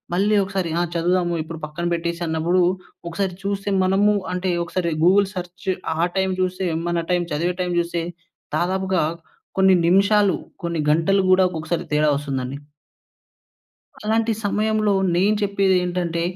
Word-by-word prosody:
మళ్ళీ 205 +3 +2
ఒకసారి 190 -3 -2
ఆహ్, 175 -1 0
చదువుదాము 175 0 +1
ఇప్పుడు 160 0 -8
పక్కన 155 +3 -5
పెట్టేసన్నప్పుడూ, 170 +1 0 0.5
ఒకసారి 190 +1 -2
చూస్తే 200 0 -2
మనము 200 +3 +3 0.2
అంటే. 180 0 -1
ఒకసారి 170 -1 -2
గూగుల్ 195 +2 +5
సర్చ్ 180 0 -8 0.3
ఆ - - -4 0.2
టైమ్ 190 0 +1
చూస్తే, 185 0 -1 0.2
మన 170 -1 -1
టైమ్ 175 -1 +1
చదివే 175 +4 -1
టైమ్ 180 -1 -1
చూస్తే, 170 0 -3 0.6
దాదాపుగా 190 0 0 0.6
కొన్ని 190 -1 +6
నిమిషాలు, 200 +2 +4 0.3
కొన్ని 170 -2 -1
గంటలు 180 +6 +3
గూడా 185 0 +6
ఒక్కొక్కసారి 160 -1 -3
తేడా 150 0 +3
వస్తుందండి. 135 -2 -3 1.5
అలాంటి 225 +1 +1
సమయంలో 215 +1 +1 0.2
నేను 200 +4 +3
చెప్పేదేంటంటే, 180 -4 +1
180 Hz, 130 wpm, -22 LUFS, 170-195 Hz, 1.5 s, కొన్ని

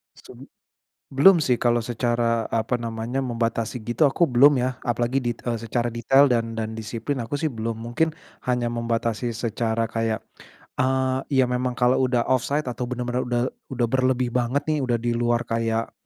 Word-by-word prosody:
Sum - - -14 0.6
belum 165 +7 +6
sih 130 -5 +2
kalau 120 0 +2
secara, 115 -1 -1
apa 115 +2 0
namanya, 115 +2 -3
membatasi 115 -1 -2
gitu, 120 +7 0
aku 150 +4 +3
belum, 135 +2 +5
ya. 125 +1 -1
Apalagi 120 +2 0
dit 120 -1 -2 0.2
secara 115 +1 -2
detail 135 +4 +4
dan 115 -3 0
dan 110 -1 -4
disiplin, 110 +5 -4
aku 145 +6 -4
sih 160 - 0
belum. 115 -4 -4
Mungkin, 120 +8 0 0.3
hanya 125 -1 0
membatasi 115 0 -1
secara 115 0 -1
kayak, 115 0 -1 0.6
eee, 130 0 +1
ya 135 -3 +3
memang 125 0 -1
kalau 125 +1 +3
udah 125 -2 +1
offside 140 +4 0
atau 125 0 -4
bener-bener 125 0 -2
udah 120 0 +1 0.3
udah 125 -2 -1
berlebih 130 0 +1
banget 125 +4 0
nih, 155 0 0
udah 125 -2 +1
di 120 +1 -1
luar 120 0 +1
kayak 115 0 -1
120 Hz, 165 wpm, -24 LUFS, 115-130 Hz, 0.6 s, belum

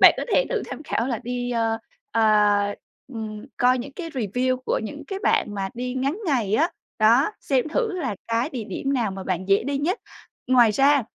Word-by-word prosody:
bạn - - +9
có - - -2
thể - - +4
thử 475 -4 0
tham 300 - -7
khảo 240 -4 -1
là 240 -4 -1
đi, 245 0 -3
ờ, 225 -1 0 0.3
ờ, 210 -2 +3 0.4
ừm, 215 -2 -6
coi 250 +1 +4
những 265 +3 -6
cái 330 +3 -6
review 255 +1 0
của - - +1
những 295 +6 -6
cái 390 - -4
bạn 210 - +2
mà 195 -1 -2
đi 250 +1 -3
ngắn 275 +5 0
ngày 235 - +1
á, 320 +9 +3 0.3
đó, 235 - +5
xem 270 +1 +1
thử 455 +6 0
là 260 - -2
cái 230 +5 +1
địa 245 -8 -4
điểm 275 +5 -3
nào 235 -7 +1
mà 190 0 -6
bạn 185 0 -2
dễ 195 - +4
đi 280 0 -1
nhất. 350 +10 0 0.5
Ngoài 245 -3 +6
ra 275 +4 +4
245 Hz, 210 wpm, -24 LUFS, 215-275 Hz, 0.5 s, bạn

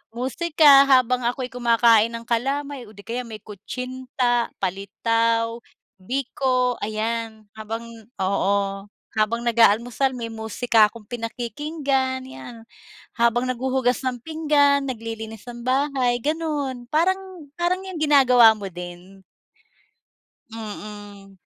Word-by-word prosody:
Musika 280 +2 +5
habang 255 -1 +4
ako'y 250 +1 -2
kumakain 230 -2 +4
ng 230 0 -6
kalamay 275 +2 -2
o 215 - -15
di 205 - -13
kaya 245 +2 -3
may 215 -1 -8
kutsinta, 250 +3 -2
palitaw, 230 +4 0 0.4
biko 255 +1 0
ayan, 220 0 -3
habang 225 +2 -5 0.4
oo. 195 +1 0 0.3
Habang 225 +2 0
nag-aalmusal 235 +3 +3
may 230 -2 -4
musika 220 0 +2
akong 225 -3 -14
pinakikinggan 260 +3 -2
yan, 245 -2 -10 0.6
habang 235 +1 +2
naghuhugas 255 0 0
ng 250 -1 -2
pinggan, 295 -3 +2
naglilinis 225 -2 -6
ng 240 -1 -8
bahay 260 -2 +1
ganun. 295 -5 -2
Parang 370 0 -1
parang 355 +2 +1
yung 375 -2 -7
ginagawa 255 -6 +6
mo 200 -2 -6
din. 180 +2 -10 1.3
Mm. 205 -2 -9
240 Hz, 105 wpm, -23 LUFS, 220-265 Hz, 1.3 s, ginagawa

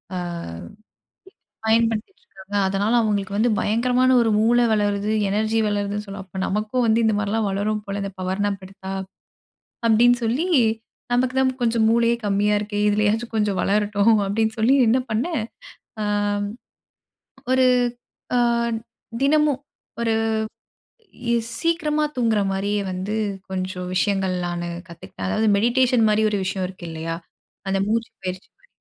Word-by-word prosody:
ஆ, - - -2 1.5
பயன்படுத்திட்டு 225 - +1
இருக்கிறாங்க. 200 - -10
அதனால 200 +4 0
அவுங்களுக்கு 200 -3 0
வந்து 235 +3 +3
பயங்கரமான 250 +4 +2
ஒரு 230 - +2
மூளை 240 +2 +4
வளருது. 205 0 0 0.2
எனர்ஜி 215 +2 0
வளருதுன்னு 205 0 -2
சொல்லுவ 195 0 -7
"அப்ப 190 0 -8
நமக்கும் 215 +5 0
வந்து 225 0 +3
இந்தமாரிலாம் 210 0 +1
வளரும் 210 +2 -1
போல 200 -1 -4
இந்த 200 0 -4
பவர் 185 +2 -2
நாப் 200 -1 -2
எடுத்தா!" 190 0 -9 0.9
அப்பிடின்னு 240 +2 +5
சொல்லி 250 +10 0 0.6
"நமக்கு 255 +1 +1
தான் 260 0 +3
கொஞ்சம் 230 -1 +2
மூளையே 235 +1 +3
கம்மியா 205 +1 +2
இருக்கே! 205 0 -3
இதிலயாச்சும் 215 +3 0
கொஞ்சம் 210 -3 +1
வளரட்டும்" 210 +2 +2
அப்பிடின்னு 220 +2 0
சொல்லி 240 +5 +4
என்ன 255 +3 +3
பண்ணேன் 235 +2 -1 0.6
ஆம், 205 0 0 1.0
ஒரு 260 0 +4 0.7
அ - - +4 0.8
தினமும் 295 -1 +3 0.4
ஒரு 230 -1 +1 1.2
இ - - +3 0.3
சீக்கிரமா 305 -2 +1
தூங்குகிறமாரியே 205 -3 +1
வந்து 190 +3 -3 0.4
கொஞ்சம் 185 -1 -4
விஷயங்கள் 195 -1 +1
நானு 175 0 -3 0.2
கத்துக்கிட்டேன். 165 - -8
அதாவது 215 - +1
மெடிடேஷன் 240 +1 +3
மாரி 210 +1 +2
ஒரு 205 - 0
விஷயம் 190 0 -2
இருக்கு 185 -2 -10
இல்லயா? 165 +1 -4 0.5
அந்த 195 - +1
மூச்சு 230 +1 -1
பயிற்சிமாரி. 185 0 -7
210 Hz, 125 wpm, -22 LUFS, 200-230 Hz, 1.5 s, அப்பிடின்னு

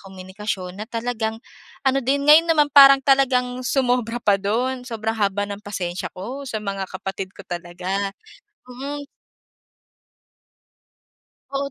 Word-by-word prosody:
komunikasyon 190 0 -6
na 220 - -7
talagang 225 -1 -2 0.5
ano 265 +1 +4
din 280 +2 +1
ngayon 320 +3 +7
naman 300 -2 +4
parang 275 -1 +10
talagang 255 -2 +2
sumobra 245 -3 +1
pa 205 - +4
dun 245 +6 -1
sobrang 225 -2 -3
haba 205 -1 0
ng 205 +1 -7
pasensiya 185 -3 -4
ko 245 +10 -6
sa 220 - -3
mga 195 -2 -4
kapatid 190 0 -5
ko - - -10
talaga, 180 +3 -3 0.6
mm. 280 +3 -6 2.4
Oo, 275 0 -2
225 Hz, 125 wpm, -22 LUFS, 195-260 Hz, 2.4 s, parang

